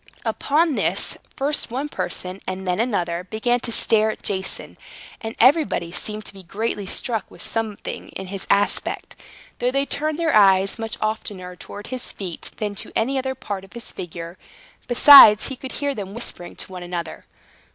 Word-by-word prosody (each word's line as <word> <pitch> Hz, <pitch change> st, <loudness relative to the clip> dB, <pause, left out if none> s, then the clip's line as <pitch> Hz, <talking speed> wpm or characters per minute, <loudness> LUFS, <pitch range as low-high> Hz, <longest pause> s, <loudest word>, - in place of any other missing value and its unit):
Upon 310 Hz, +2 st, +1 dB
this, -, -, -1 dB, 0.2 s
first 285 Hz, +2 st, +2 dB
one 265 Hz, +5 st, -3 dB
person, 185 Hz, -9 st, -4 dB
and 185 Hz, 0 st, -4 dB
then 180 Hz, +1 st, 0 dB
another, 180 Hz, -7 st, -1 dB
began 240 Hz, +3 st, +1 dB
to 235 Hz, -, -2 dB
stare 220 Hz, -1 st, +3 dB
at -, -, -6 dB
Jason, 190 Hz, -2 st, -1 dB, 0.4 s
and 225 Hz, 0 st, -5 dB
everybody 255 Hz, -, +3 dB
seemed 210 Hz, +3 st, -1 dB
to -, -, -6 dB
be 195 Hz, -, -11 dB
greatly 205 Hz, +2 st, -3 dB
struck 225 Hz, +1 st, -3 dB
with -, -, -16 dB
something 220 Hz, -3 st, -4 dB
in 190 Hz, -, -7 dB
his 195 Hz, +1 st, -6 dB
aspect; 205 Hz, 0 st, 0 dB, 0.4 s
though 245 Hz, -, +1 dB
they 275 Hz, +2 st, +1 dB
turned 305 Hz, +2 st, -1 dB
their 330 Hz, -3 st, +1 dB
eyes 195 Hz, 0 st, +5 dB
much 225 Hz, -1 st, -4 dB
oftener 200 Hz, -4 st, -3 dB
towards 205 Hz, +5 st, -10 dB
his 255 Hz, -1 st, -4 dB
feet 180 Hz, -4 st, -4 dB
than 210 Hz, -2 st, -2 dB
to 200 Hz, -, -5 dB
any 265 Hz, +4 st, +1 dB
other 265 Hz, 0 st, -3 dB
part 200 Hz, -6 st, -5 dB
of 195 Hz, -, -16 dB
his 235 Hz, -1 st, -8 dB
figure. 170 Hz, 0 st, -8 dB, 0.5 s
Besides, 245 Hz, -3 st, +9 dB
he 265 Hz, -, -5 dB
could 260 Hz, +1 st, -8 dB
hear 285 Hz, -1 st, -1 dB
them 200 Hz, -3 st, -7 dB
whispering 205 Hz, -6 st, -4 dB
to -, -, -9 dB
one 180 Hz, -1 st, -7 dB
another. 175 Hz, -2 st, -6 dB
215 Hz, 175 wpm, -22 LUFS, 190-255 Hz, 0.5 s, Besides